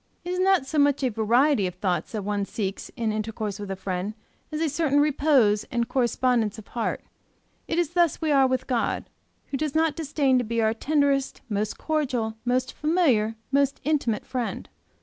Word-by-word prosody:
It 355 - -3
is 365 - -1
not 380 -6 +3
so 300 +3 -1
much 285 -1 +3
a 260 - +3
variety 230 +1 +3
of 180 - -6
thoughts 180 +1 -2
that 215 -2 -3
one 205 0 -1
seeks 195 -1 -4
in 225 -2 0
intercourse 215 -1 -3
with 205 -1 -6
a 195 - -2
friend, 190 +2 -4 0.4
as 305 - -3
a 325 - +1
certain 290 -1 +1
repose 275 -8 +3
and 235 -1 -1
correspondence 240 -3 +1
of 220 - -12
heart. 235 - -2 0.7
It 330 - -1
is 345 -3 +1
thus 345 -3 +2
we 315 -2 0
are 270 -2 +5
with 260 0 -1
God, 245 -3 -1 0.4
who 275 - -1
does 300 0 -2
not 320 -1 +2
disdain 280 -5 +1
to - - 0
be 230 0 -2
our 220 -1 +2
tenderest, 280 +2 0
most 210 0 -2
cordial, 255 -8 -1
most 255 +1 0
familiar, 285 -10 +2 0.2
most 280 0 +2
intimate 275 -8 0
friend. 250 -3 -4
255 Hz, 190 wpm, -25 LUFS, 220-295 Hz, 0.7 s, are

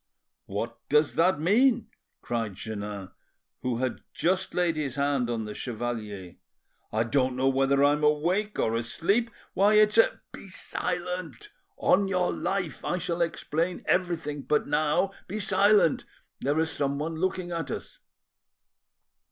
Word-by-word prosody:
"What 115 +4 -4
does 150 +1 +3
that 170 -2 +3
mean?" 225 - +3 0.3
cried 115 -5 -2
Jeannin, 105 -2 -6 0.5
who 125 -2 -1
had 130 0 -2
just 185 +2 0
laid 175 -2 +2
his 140 -5 -2
hand 140 -3 +1
on 115 -2 -2
the 105 - -6
chevalier. 110 -6 -5 0.5
"I 110 +1 +1
don't 130 +2 +1
know 130 +1 +1
whether 135 +1 +3
I'm 145 +1 +3
awake 175 +8 +1
or 115 - +1
asleep! 195 - 0 0.2
Why, 205 +3 +4
it's 215 +1 +5
a— - - +3
" - - -56
"Be - - -10
silent, 180 - -4 0.3
on 195 +1 +3
your 180 -2 +1
life! 185 -5 -2
I 180 - -1
shall 175 -1 -2
explain 170 +1 -1
everything—but 160 -5 0
now 155 +6 +1 0.2
be 210 +4 -4
silent; 205 -4 +3 0.3
there 145 +3 0
is 160 0 +1
someone 145 +3 -2
looking 185 0 -1
at 165 -4 -3
us." - - -6
155 Hz, 140 wpm, -27 LUFS, 130-185 Hz, 0.5 s, it's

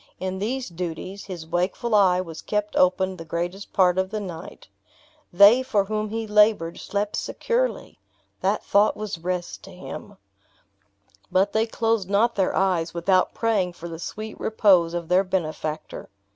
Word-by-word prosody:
In 190 0 -3
these 250 +5 -2
duties, 180 +3 -6
his 180 -5 -7
wakeful 180 +8 -1
eye 185 -3 +4
was 165 -3 -8
kept 210 0 -2
open 185 +1 +2
the 165 - -7
greatest 175 +4 -4
part 185 -1 +3
of 190 0 0
the 215 +1 -3
night. 180 -4 -8 0.6
They 200 +7 +7
for 215 -7 +1
whom 215 +1 -2
he 225 +1 -3
labored 210 -5 +3
slept 205 0 -2
securely! - - -2 0.4
That - - 0
thought 205 +1 +3
was 210 -5 -5
rest 180 +1 -4
to - - -12
him. - - -9 1.1
But 195 +2 +2
they 220 +1 +2
closed 225 -4 0
not 220 +4 +3
their 190 -2 0
eyes 175 -3 0
without 185 +2 +2
praying 205 -6 0
for 170 0 -9
the 165 -1 -7
sweet 215 +5 -7
repose 185 -6 +3
of 170 -1 -4
their 180 +3 +4
benefactor. 155 -4 -4
190 Hz, 160 wpm, -24 LUFS, 175-210 Hz, 1.1 s, They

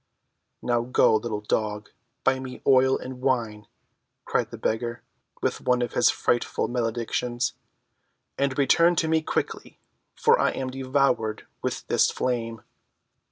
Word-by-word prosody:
"Now 120 -1 +1
go, 120 -2 +3
little 110 -1 -2
dog, 105 -1 -2 0.3
buy 135 0 +2
me 130 -1 -8
oil 130 0 +5
and 130 -1 -8
wine," 115 -6 -1 0.6
cried - - 0
the - - -8
beggar, 120 +2 -2 0.4
with - - -1
one 125 -1 +2
of 120 - -4
his 120 - +4
frightful 120 - 0
maledictions, 120 0 -1 0.8
"and 140 -1 -1
return 170 +5 +4
to 160 - +1
me 160 0 +2
quickly, - - -3 0.4
for 460 +2 +4
I - - +2
am 130 -1 -3
devoured 130 -4 0 0.2
with - - -3
this - - +3
flame." 115 -3 -2
125 Hz, 135 wpm, -25 LUFS, 115-130 Hz, 0.8 s, oil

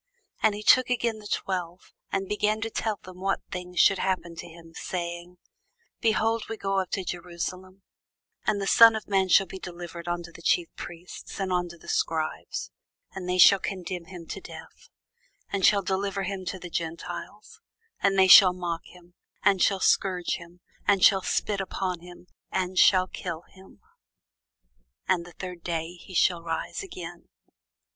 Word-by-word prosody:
And 210 - +3
he 210 - -7
took 255 +3 +6
again 235 -3 0
the 210 - -10
twelve, 180 -2 -3 0.2
and 195 0 -1
began 210 +1 0
to 225 0 -3
tell 215 -2 -2
them 185 0 -12
what 195 0 0
things 180 -1 -5
should 195 +2 +5
happen 185 -2 -1
unto 170 - -8
him, 165 0 -14
saying, 175 0 -5 0.6
Behold, 225 0 +1
we 225 - -4
go 195 -1 0
up 185 - -3
to 190 - -1
Jerusalem; 180 +2 -6 0.6
and 205 - +2
the 195 - -2
Son 230 +3 +8
of 220 - -5
man 195 -2 +2
shall 195 - +6
be 190 +1 -9
delivered 175 -1 -8
unto 175 0 -3
the 170 - -13
chief 170 0 +2
priests, 175 +3 -9
and 190 -1 -1
unto 175 -1 -2
the - - -17
scribes; 440 0 -2 0.4
and 185 -2 -6
they 180 - +1
shall 195 +2 +8
condemn 185 -2 -5
him 175 -2 -10
to - - -7
death, - - -12 0.6
and 195 -2 +3
shall 200 -1 +3
deliver 195 +1 -1
him 190 0 -4
to 180 +1 -3
the 180 -1 -9
Gentiles: 165 0 -6 0.4
and 195 -1 +2
they 190 0 +6
shall 185 0 +10
mock 175 -2 -3
him, 175 -1 -17 0.3
and 195 -2 +4
shall 195 - +3
scourge 185 -2 +1
him, 170 +1 -14 0.3
and 200 -2 +3
shall 195 -3 +5
spit 200 +1 -1
upon 185 -2 -3
him, 175 +1 -13 0.3
and 185 -1 -1
shall 185 -1 +6
kill 175 -2 -6
him: 190 - -18 1.3
and 170 -1 +1
the 175 - -13
third 180 -1 -7
day 165 0 -3
he 180 +1 -12
shall 175 0 +3
rise 165 -1 -4
again. 175 - -9
185 Hz, 170 wpm, -27 LUFS, 175-195 Hz, 1.3 s, shall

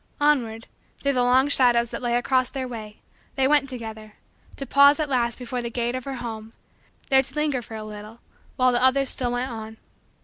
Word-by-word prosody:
Onward, 245 -7 +1 0.4
through 280 0 +2
the 250 - +1
long 255 +2 +4
shadows 240 -4 +3
that - - -5
lay 240 -1 0
across 255 +1 +1
their 265 -2 -4
way, 215 -3 -9 0.3
they 265 -1 +2
went 285 -1 +3
together, 220 -4 -7 0.4
to 275 - -6
pause 280 +3 +5
at 305 - 0
last 240 -3 0
before 250 0 -4
the 235 - -4
gate 240 0 -2
of 255 -1 -5
her 275 -1 -4
home, 225 -2 -7 0.6
there 265 0 +6
to 270 +1 -7
linger 300 -4 0
for 225 -1 -10
a 215 - -6
little, 215 +1 -10 0.4
while 255 0 +3
the 240 0 +1
others 265 +1 +3
still 245 -2 -2
went 245 +1 -2
on. 220 -1 -8
245 Hz, 205 wpm, -24 LUFS, 230-265 Hz, 0.6 s, there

